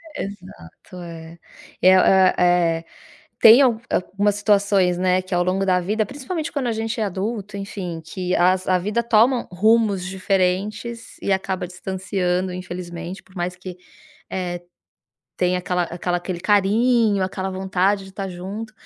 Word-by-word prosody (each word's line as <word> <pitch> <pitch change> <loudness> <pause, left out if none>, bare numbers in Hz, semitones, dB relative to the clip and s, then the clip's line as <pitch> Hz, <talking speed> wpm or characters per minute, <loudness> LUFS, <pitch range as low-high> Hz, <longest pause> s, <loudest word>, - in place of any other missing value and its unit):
Exato, 185 - -9
é. 165 0 -10 0.4
É 185 +1 +7
o - - +5
é 190 -1 +4
é 170 -2 +2 0.5
tem 230 +4 +9
al 235 -4 +3
algumas 200 +2 0
situações, 200 -3 +2
né, 185 0 +2
que 185 0 -8
ao 175 - +2
longo 190 +2 0
da 185 -1 +3
vida, 210 +4 -1
principalmente 295 - -5
quando 270 -4 -2
a - - 0
gente 225 +1 -3
é - - +2
adulto, 205 +1 -4
enfim, 185 -4 -6
que 180 +2 -3
as 185 +1 +2
a 185 - +3
vida 210 +5 -1
toma 235 +2 +3
rumos 210 0 +2
diferentes 195 +4 -2
e 200 - -1
acaba 190 -1 -1
distanciando, 185 0 -2
infelizmente, 180 0 -7
por 185 - -23
mais 180 +1 -3
que, 185 0 -9 0.5
eh, 175 -2 -3 0.8
tenha 180 0 +1
aquela 180 0 -1
aquela 175 +1 -2
aquele 175 0 -5
carinho, 210 +2 +3
aquela 190 0 -3
vontade 190 +1 0
de 190 - -13
tá 195 0 -4
junto. 195 +5 -7
190 Hz, 155 wpm, -22 LUFS, 180-210 Hz, 0.8 s, tem